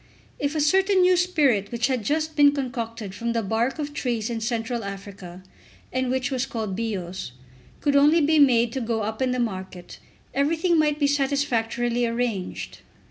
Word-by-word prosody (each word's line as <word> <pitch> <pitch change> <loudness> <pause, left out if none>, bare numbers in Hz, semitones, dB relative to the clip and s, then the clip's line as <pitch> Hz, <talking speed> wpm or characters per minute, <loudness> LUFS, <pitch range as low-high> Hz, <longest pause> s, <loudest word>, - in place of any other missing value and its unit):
If 285 +1 -1
a - - 0
certain 380 +6 +3
new 365 0 +5
spirit 290 - +2
which 235 0 0
had 255 -4 0
just 310 +6 -1
been 285 -1 +6
concocted 230 -6 -4
from 235 +4 -3
the 230 -1 0
bark 225 +7 0
of 295 -1 -4
trees 240 -5 -2
in 230 -1 -3
Central 230 0 -2
Africa, 195 -2 -8 0.5
and 255 0 0
which 260 +1 -1
was 260 0 -1
called 215 -5 -4
Bios, 190 - -4 0.5
could 285 -1 +1
only 295 +4 +5
be 310 0 +3
made 240 -4 +4
to 265 - -2
go 225 -2 -1
up 220 +3 -4
in 260 - +2
the 250 - -1
market, 190 -5 -5 0.3
everything 320 +4 +2
might 300 -1 +2
be 295 - +1
satisfactorily 245 -4 0
arranged. 230 -5 -3
245 Hz, 175 wpm, -24 LUFS, 225-285 Hz, 0.5 s, been